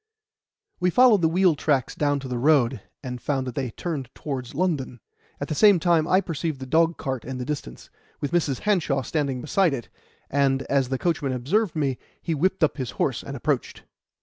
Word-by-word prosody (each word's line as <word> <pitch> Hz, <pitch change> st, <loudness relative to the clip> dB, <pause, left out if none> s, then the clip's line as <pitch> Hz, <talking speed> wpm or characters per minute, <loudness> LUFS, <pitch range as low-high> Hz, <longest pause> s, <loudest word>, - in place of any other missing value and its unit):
We 180 Hz, -, +2 dB
followed 230 Hz, 0 st, +5 dB
the 160 Hz, -, +3 dB
wheel 180 Hz, +1 st, +4 dB
tracks 145 Hz, -3 st, 0 dB
down 145 Hz, -1 st, 0 dB
to 135 Hz, -, -6 dB
the 125 Hz, -1 st, -3 dB
road, 135 Hz, -3 st, +3 dB, 0.2 s
and 125 Hz, -2 st, -5 dB
found 135 Hz, -3 st, -1 dB
that 125 Hz, -, -5 dB
they 130 Hz, -1 st, -2 dB
turned 140 Hz, 0 st, -4 dB
towards 135 Hz, -4 st, -5 dB
London. 145 Hz, -8 st, -1 dB, 0.4 s
At -, -, -3 dB
the -, -, -2 dB
same 200 Hz, +3 st, +6 dB
time 165 Hz, -2 st, +2 dB
I 185 Hz, +2 st, +4 dB
perceived 165 Hz, -5 st, -3 dB
the 130 Hz, -, -6 dB
dogcart 150 Hz, -4 st, +1 dB
in 130 Hz, +1 st, -5 dB
the 125 Hz, -, -4 dB
distance, 130 Hz, -, -6 dB, 0.3 s
with 145 Hz, -, -3 dB
Mrs. 155 Hz, -6 st, 0 dB
Hanshaw 160 Hz, -10 st, +1 dB
standing 140 Hz, -2 st, -2 dB
beside 165 Hz, +2 st, +2 dB
it; 120 Hz, -, -8 dB, 0.4 s
and, 135 Hz, -1 st, +1 dB
as 135 Hz, -3 st, +1 dB
the 130 Hz, -, -1 dB
coachman 145 Hz, -4 st, -1 dB
observed 170 Hz, -, 0 dB
me, 140 Hz, -5 st, -1 dB, 0.2 s
he 165 Hz, -, -2 dB
whipped 185 Hz, +4 st, +1 dB
up 155 Hz, -, +2 dB
his 130 Hz, -4 st, -3 dB
horse -, -, 0 dB
and -, -, -6 dB
approached. -, -, -2 dB
145 Hz, 195 wpm, -25 LUFS, 130-170 Hz, 0.4 s, same